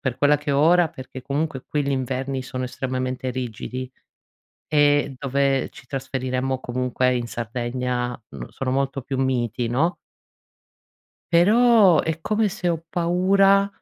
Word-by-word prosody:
per 130 -3 -2
quella 145 0 +4
che 145 0 -4
ho 140 - +2
ora 170 +2 +5
perché 130 -2 -9
comunque 140 0 -3
qui 150 -2 0
gli 140 - -1
inverni 130 0 -2
sono 130 0 -5
estremamente 130 0 -3
rigidi 125 +1 -5 0.8
e 145 -2 +3
dove 135 0 0
ci - - -14
trasferiremmo 130 -1 -2
comunque 125 0 0
in 120 -1 -2
Sardegna 120 +1 -3 0.3
sono 130 -1 -3
molto 135 0 -1
più 135 +2 -4
miti 125 -2 0
no 145 +10 +1 1.4
però 210 +1 +6
è 160 0 -3
come 215 +4 +1
se 185 -2 -3
ho 165 -1 -1
paura 195 +3 +3
135 Hz, 135 wpm, -23 LUFS, 125-160 Hz, 1.4 s, però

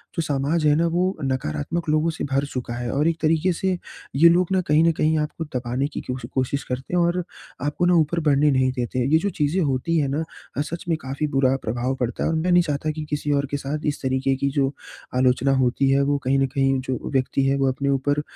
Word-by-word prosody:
जो 165 - 0
समाज 150 +1 0
है 150 - +5
ना 165 +2 +2
वो 180 +1 +2 0.2
नकारात्मक 130 - -2
लोगों 155 +2 +2
से 160 - -6
भर 135 +1 +1
चुका 125 -3 -5
है 120 0 -4
और 150 +3 +1
एक 165 -1 +1
तरीक़े 160 +3 +2
से 190 +3 -1 0.5
ये 165 +5 +7
लोग 175 +1 +3
ना 190 -1 +3
कहीं 150 +2 +4
न 165 - +4
कहीं 155 +1 +1
आपको 150 +2 -3
दबाने 125 +3 -1
की 150 - -6
क्यो 125 - -4 0.2
कोशिश 130 +1 -1
करते 130 +6 -5
हैं 175 - +3
और 175 +1 0 0.4
आपको 145 +4 0
ना 180 - +4
ऊपर 165 +1 +2
बढ़ने 150 -1 +3
नहीं 130 -1 +2
देते। 125 0 -3
ये - - +7
जो 200 +5 -1
चीज़ें 160 +1 0
होती 145 +2 0
हैं 145 -3 +2
ना 145 +4 -1 0.3
अ, - - +2
सच 170 +3 -5
में 165 - +3
काफ़ी 135 +3 -3
बुरा 135 -2 +2
प्रभाव 120 +4 -1
पड़ता 125 -1 -2
है। - - +1
और 165 - 0
मैं 165 +3 0
नहीं 175 0 +5
चाहता 155 -1 -2
कि 155 0 -6
किसी 150 0 -2
और 140 0 +1
के 145 - 0
साथ 145 +2 -4
इस 145 - -2
तरीक़े 130 0 0
की 140 +1 -1
जो 135 -2 +2 0.5
आलोचना 130 +1 +3
होती 130 +1 +2
है 135 +1 +3
वो 145 +1 +1
कहीं 135 +2 +2
न 135 - +3
कहीं 135 -1 +2
जो 130 - -1
व्यक्ति 135 +1 +1
है 135 - +2
वो 135 -1 +2
अपने 140 +2 -2
ऊपर 145 +2 +1
140 Hz, 245 wpm, -23 LUFS, 130-160 Hz, 0.5 s, ये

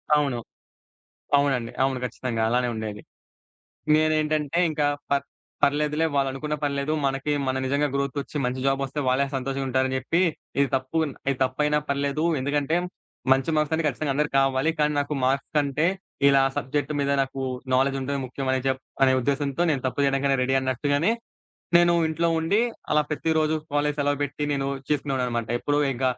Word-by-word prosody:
అవును. 140 -5 +1 1.0
అవునండి. 135 -5 +1
అవును 135 -1 +1
ఖచ్చితంగా! 120 -1 -3
అలానే 125 +1 +1
ఉండేది. 110 -1 -5 1.0
నేనేంటంటే, 155 0 +1
ఇంకా 150 -2 +1 0.2
పర్ 140 0 +2 0.4
పర్లేదులే, 150 +2 +2
వాళ్ళనుకున్న 140 +2 -1
పర్లేదు, 140 +1 0
మనకీ 135 +2 0
మనం 130 0 0
నిజంగా 140 +2 +1
గ్రోతొచ్చి, 140 +1 -3
మంచి 125 +1 -2
జాబొస్తే, 135 +1 0
వాళ్ళే 130 +2 +3
సంతోషంగా 135 +1 -2
ఉంటారని 130 0 +1
జెప్పీ, 160 +7 0 0.4
ఇది 140 - +4
తప్పుగున్న 140 +3 -1 0.2
ఇది 135 - -3
తప్పయినా 150 +3 +1
పర్లేదూ, 140 +2 0
ఎందుకంటే, 145 +3 0 0.6
మంచి 135 +3 +3
మార్క్స్ 150 0 +1
అన్నీ 160 0 -1
ఖచ్చితంగా 145 0 -1
అందరికి 150 -1 0
కావాలి, 135 +3 +2
కానీ 150 0 +2
నాకు 145 +1 -2
మార్క్స్ 135 +2 0
కంటే, 145 +2 +2 0.4
ఇలా 140 -1 +5 0.2
సబ్జెక్ట్ 145 +3 -1
మీద 140 0 +1
నాకూ 135 0 -3 0.3
నాలెడ్జుంటమే 135 +1 +1
ముఖ్యమని 130 +1 -1
జెప్ 130 0 0 0.2
అనే 130 -1 +5
ఉద్దేశంతో, 140 +3 -1
నేను 135 -4 -2
తప్పు 130 +2 -1
జేయడానికైనా 135 0 +2
రెడీ 135 +1 +1
అన్నట్టుగానే, 145 - +1 0.7
నేనూ 175 0 +4 0.2
ఇంట్లో 165 +2 0
ఉండీ, 185 +7 +2 0.3
అలా 150 - +4
ప్రతిరోజు 155 0 +1 0.2
కాలేజీ 145 0 +1
సెలవు 145 0 +1
బెట్టి, 145 +1 -3
నేను 135 -1 -1 0.2
చేసుకునేవాడిననమాట. 130 -5 -1
ఎప్పుడూ 145 +3 0
ఇంక 125 +1 -5
140 Hz, 145 wpm, -25 LUFS, 130-150 Hz, 1.0 s, ఇలా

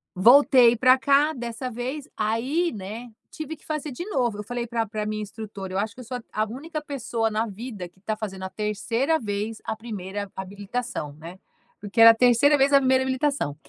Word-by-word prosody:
Voltei 240 +3 +6
pra 255 +2 +5
cá, 280 +3 +3
dessa 240 0 -5
vez. 260 +5 -5
Aí, 255 +11 0
né, 215 +5 -7 0.2
tive 315 0 -6
que - - -24
fazer 305 -1 -3
de 260 +7 -6
novo. 240 - 0
Eu - - -4
falei 240 +2 -4
pra 230 -1 -1
pra 215 0 -4
a - - -4
minha 215 0 -3
instrutora: 205 -2 -7
"Eu 190 - 0
acho 210 +1 -2
que 255 - -10
eu - - -9
sou 250 +2 -4
a 220 -2 -3
a - - 0
única 300 +7 -6
pessoa 240 -6 -2
na 215 +1 0
vida 210 -3 -7
que 185 +2 -30
tá 215 +1 -3
fazendo 195 -3 -6
a 190 - -4
3ª 230 +9 -1
vez 210 +1 -4
a - - -2
1ª 205 -3 -6
habilitação, 200 -3 -5
né", 165 +5 -11 0.4
porque 210 +3 0
era 230 - +11
a - - 0
3ª 250 +5 +5
vez 275 +1 +3
a 280 - +8
1ª 260 -1 +3
habilitação. 260 - -1
230 Hz, 210 wpm, -25 LUFS, 210-260 Hz, 0.4 s, era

